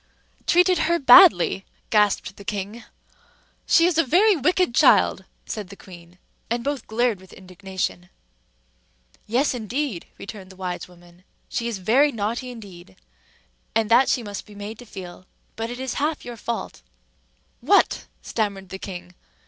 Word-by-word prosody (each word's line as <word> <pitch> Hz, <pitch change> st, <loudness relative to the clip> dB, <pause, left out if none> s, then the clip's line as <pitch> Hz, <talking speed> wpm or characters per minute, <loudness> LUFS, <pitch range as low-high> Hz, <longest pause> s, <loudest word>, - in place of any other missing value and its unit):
"Treated 360 Hz, +1 st, +4 dB
her 340 Hz, -, +3 dB
badly?" 200 Hz, -, +7 dB, 0.3 s
gasped 210 Hz, -2 st, +2 dB
the 200 Hz, -, -12 dB
king. 205 Hz, +3 st, -5 dB, 0.8 s
"She 335 Hz, -, +5 dB
is 345 Hz, -2 st, +2 dB
a -, -, +5 dB
very 380 Hz, -, +4 dB
wicked 360 Hz, -1 st, +1 dB
child," -, -, +4 dB, 0.2 s
said 210 Hz, -4 st, -5 dB
the 200 Hz, -, -10 dB
queen; 175 Hz, -2 st, -15 dB, 0.3 s
and 235 Hz, +1 st, -1 dB
both 280 Hz, -2 st, -3 dB
glared 225 Hz, -3 st, 0 dB
with 190 Hz, -, -17 dB
indignation. 185 Hz, -1 st, -5 dB, 1.2 s
"Yes, 255 Hz, +7 st, +1 dB
indeed!" 245 Hz, -, -3 dB
returned 200 Hz, -2 st, -9 dB
the 190 Hz, -, -14 dB
wise 185 Hz, -1 st, -5 dB
woman. 175 Hz, 0 st, -19 dB, 0.3 s
"She 235 Hz, -, -2 dB
is 230 Hz, -3 st, -3 dB
very 250 Hz, +10 st, +3 dB
naughty 230 Hz, +3 st, -3 dB
indeed, 190 Hz, -, -12 dB, 0.8 s
and 225 Hz, -1 st, +1 dB
that 250 Hz, +3 st, +5 dB
she 245 Hz, -, +1 dB
must 205 Hz, -1 st, -7 dB
be 210 Hz, -, -14 dB
made 205 Hz, +2 st, -8 dB
to 245 Hz, -, -12 dB
feel; 185 Hz, -2 st, -10 dB, 0.3 s
but 225 Hz, +1 st, -4 dB
it 245 Hz, +1 st, -7 dB
is 260 Hz, -1 st, -3 dB
half 300 Hz, +2 st, -2 dB
your 240 Hz, -1 st, -7 dB
fault 235 Hz, +1 st, -5 dB
too." -, -, -29 dB
"What!" -, -, +3 dB, 0.2 s
stammered 200 Hz, -3 st, -3 dB
the 190 Hz, -, -7 dB
king. 180 Hz, -2 st, -8 dB
210 Hz, 155 wpm, -23 LUFS, 185-245 Hz, 1.2 s, badly